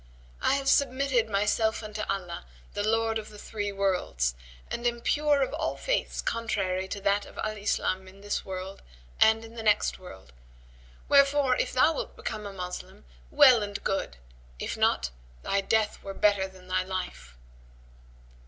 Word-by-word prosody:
I - - +3
have 275 -1 -2
submitted 265 -4 +2
myself 210 +2 +1
unto 215 0 -5
Allah, 180 - -3 0.3
The - - -2
Lord 225 +1 +1
of 215 - -9
the 210 - -12
Three 205 -1 -4
Worlds, 185 - 0 0.4
and 240 +1 -1
am 235 0 -1
pure 290 +2 +2
of - - -3
all - - -2
faiths - - -1
contrary 190 -5 -1
to 200 - -4
that 200 +1 +1
of - - -14
Al 215 0 -2
Islam 190 -2 -1
in 195 +1 -14
this 205 0 -2
world 190 0 -6 0.4
and 220 +1 +5
in 225 - -12
the 230 - -6
next 210 -2 +2
world. 95 - -12 0.7
Wherefore, 280 -2 +5
if - - 0
thou 300 +5 +4
wilt - - -5
become 210 -1 -5
a - - -6
Moslem, 180 - -7 0.2
well 240 - +7
and 205 -1 -4
good; 195 - -2 0.4
if - - -3
not, - - +2 0.3
thy 200 0 +1
death 215 +1 +1
were 195 0 -7
better 205 -2 +3
than 185 -1 -16
thy 185 0 +1
life." 180 - -5
205 Hz, 165 wpm, -28 LUFS, 190-230 Hz, 0.7 s, well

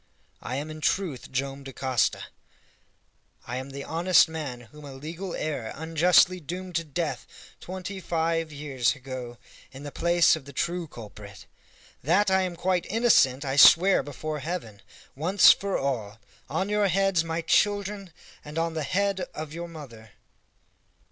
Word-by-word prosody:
I 125 - -4
am 150 +3 -4
in 155 0 -9
truth 165 -7 -1
Joam 135 +1 -3
Dacosta! 130 -2 -1 1.2
I 125 - -4
am 130 +1 -6
the 140 0 -7
honest 175 +2 +4
man 150 -7 -6
whom 150 +6 -15
a 140 -2 -9
legal 165 +7 -6
error 145 -8 -3
unjustly 170 +3 +3
doomed 180 +3 -7
to 165 - -2
death 160 +1 -4 0.3
twenty 190 +2 -6
five 165 -2 -1
years 135 -5 -1
ago 130 -3 -8 0.3
in 135 +1 -11
the 145 - -7
place 170 +1 +3
of 155 -4 -9
the 140 - -11
true 170 +4 -2
culprit! 105 -5 -11 0.6
That 190 +8 +2
I 190 0 +4
am 180 -2 -3
quite 180 0 0
innocent 185 - +3
I 135 +1 -2
swear 180 +6 +7
before 150 +2 -5
Heaven, 135 - -5 0.3
once 180 +8 +6
for 200 0 -2
all, 115 -6 -3 0.3
on 190 - -1
your 210 0 +2
heads, 195 -2 +2
my 165 0 -3
children, 200 0 0 0.3
and 150 +2 -9
on 165 0 0
the 160 - -3
head 195 +5 0 0.2
of 155 -1 -6
your 170 +1 -6
mother!" 120 -10 -12
160 Hz, 155 wpm, -26 LUFS, 135-180 Hz, 1.2 s, swear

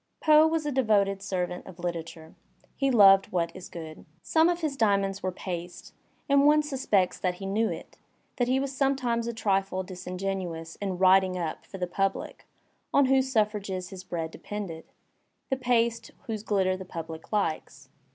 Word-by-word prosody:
Poe 310 0 +6
was 320 -1 -1
a 295 - -1
devoted 205 -7 +2
servant 180 -2 -3
of 190 - -10
literatiu^. 165 -2 -6 0.4
He 275 - +1
loved 195 -5 +6
what 170 -2 -1
is 185 - -9
good. 160 -2 -9 0.2
Some 320 +1 +3
of 350 0 -1
his 305 -3 -1
diamonds 200 -4 +1
were 185 - -1
paste, 175 -1 -7 0.3
and 280 -1 +4
one 300 0 +5
sus 275 -3 -5
pects 190 -3 +2
that 180 -1 0
he 195 - -8
knew 215 +3 +1
it, - - -8 0.4
that 245 - +1
he 260 +1 +2
was 275 0 -3
sometimes 255 -4 0
a - - -1
trifle 195 -4 0
disin 180 0 -7
genuous 180 -4 -4
in 190 -3 -2
"writing 185 0 +4
up" 165 -3 -4
for 195 - -8
the 180 - -1
public, 195 +2 -3 0.4
on 280 - +5
whose 265 0 +2
suffrages 205 -5 -1
his 190 -2 -9
bread 165 -3 -4
depended, 185 -6 -6 0.7
the - - +3
paste 235 -2 +1 0.2
whose 220 -4 -4
gUtter 190 -3 +1
the 190 - -7
pubUe 165 -3 -8
likes. 155 -8 -2
195 Hz, 175 wpm, -27 LUFS, 180-245 Hz, 0.7 s, Poe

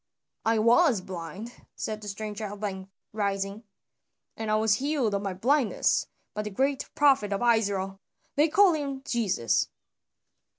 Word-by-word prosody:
"I 225 0 +3
was 235 - +4
blind," 185 +5 -8
said 215 -1 -4
the 210 - -8
stranger 210 +1 -5
at 205 0 -7
length 190 -2 -4 0.2
rising, 200 +1 -2 0.7
"and 220 -1 -4
I 215 - +3
was 215 -1 +3
healed 275 -7 0
of 200 - 0
my 195 -2 -3
blindness 255 +4 +2 0.3
by 210 - -2
the 210 - -4
great 270 +6 -1
prophet 270 -8 +4
of 200 +3 -1
Israel. 195 -3 -2 0.4
They 295 +3 +4
call 380 +3 +5
him 280 -3 -3
Jesus." 190 - +1
215 Hz, 145 wpm, -27 LUFS, 200-265 Hz, 0.7 s, call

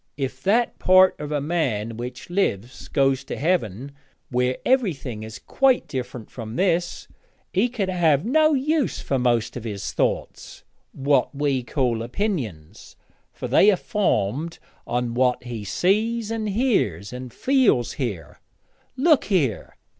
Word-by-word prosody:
'If 135 -2 -4
that 225 - +1
part 185 0 +6
of 150 0 -5
a 150 - 0
man 130 -9 -1
which 125 +6 -7
lives 130 - -2
goes 135 -2 +1
to - - -5
Heaven, 140 - -1 0.4
where 125 +1 +1
everything 160 - 0
is 110 0 -8
quite 270 -2 +1
different 125 -3 -6
from 115 -2 -7
this, 175 0 0 0.5
he 205 +7 +2
could 220 -5 -2
have 170 -4 +2
no 310 +4 +4
use 295 +2 0
for 135 - -1
most 120 -2 +1
of 120 - -6
his 100 -4 -5
thoughts - - -2 0.3
what 140 +1 +1
we 140 -2 0
call 120 -3 -1
opinions, 120 - -4 0.4
for - - -6
they 205 - +5
are 205 - +5
formed 165 - -1 0.3
on 120 0 -1
what 125 0 +1
he 120 -4 -6
sees, 215 - 0
and 220 -2 -2
hears, 195 - 0
and 125 0 -7
feels 250 - +2
here. 95 - -5 0.6
Look 305 +1 +4
here!' 150 - 0
140 Hz, 140 wpm, -23 LUFS, 120-200 Hz, 0.6 s, part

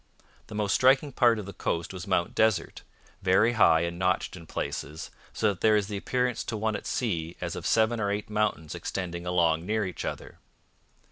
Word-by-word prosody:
The 110 - -9
most 105 -2 0
striking 135 +3 +4
part 120 -3 +4
of 105 - -5
the 100 - -8
coast 85 0 -2
was 90 -1 -7
Mount 90 -3 +1
Desert, 110 -6 +1 0.4
'very 95 +5 +4
high 100 -8 +5
and 85 0 -3
notched 95 0 0
in 85 -3 -11
places, 75 +1 -5 0.2
so 110 - +1
that 100 -3 -4
there 110 -1 +5
is 100 -1 -1
the 100 - -3
appearance 125 +2 -1
to 110 - -3
one 110 0 -1
at - - -5
sea 85 -9 -2
as 85 -1 -4
of 90 - -4
seven 115 +1 +2
or 100 -2 0
eight 105 +1 -2
mountains 105 -7 -1
extending 90 -2 -4
along 85 -2 +2
near 105 +2 0
each 90 - -5
other.' - - -6
100 Hz, 200 wpm, -28 LUFS, 85-110 Hz, 0.4 s, high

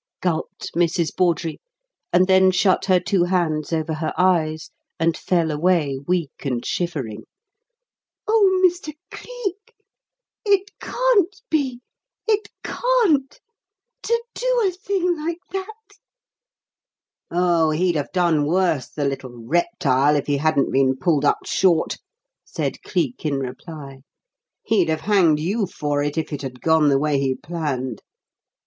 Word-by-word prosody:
gulped 165 -3 -3
Mrs. 170 -1 +1
Bawdrey, 170 -3 0 0.5
and 180 +1 +5
then 190 0 +5
shut 185 0 +2
her 185 -2 +4
two 190 -2 +1
hands 170 -4 0
over 160 -1 -1
her 155 +1 -2
eyes 160 -4 +1 0.3
and 165 0 +2
fell 170 -3 0
away 150 -3 +1
weak 175 -5 -2
and 125 -4 -2
shivering. 145 -12 -3 1.0
"Oh, 400 -4 +4
Mr. 350 -4 0 0.2
Cleek, 430 -5 -7 0.7
it 405 -1 +2
can't 440 -7 +1
be 265 -6 0 0.5
it 425 -1 +1
can't! 450 - +1 0.6
To 465 0 0
do - - +1
a - - 0
thing 365 -1 -1
like 335 +1 -2
that?" 425 +4 -7 1.4
"Oh, 175 -2 +2
he'd 175 +3 +1
have 145 -2 -2
done 170 -5 +2
worse, 170 -6 +1
the 145 - -3
little 130 -4 -5
reptile, 150 - +2
if 145 - 0
he 145 -1 0
hadn't 150 -1 +1
been 130 -1 +2
pulled 145 +1 +1
up - - +1
short," 175 -4 +2 0.5
said - - -4
Cleek 160 -10 -2
in 150 -3 0
reply. 135 +1 -7 0.6
"He'd 190 -7 +2
have 155 0 0
hanged 180 -7 +3
you 195 +6 -1
for 145 -4 -2
it, 145 +2 -2
if 160 -1 -2
it 145 - -4
had 130 -2 -7
gone 160 -1 +3
the 140 - +4
way 145 0 +1
he 135 -1 0
planned. 135 -6 -4
170 Hz, 135 wpm, -22 LUFS, 150-235 Hz, 1.4 s, and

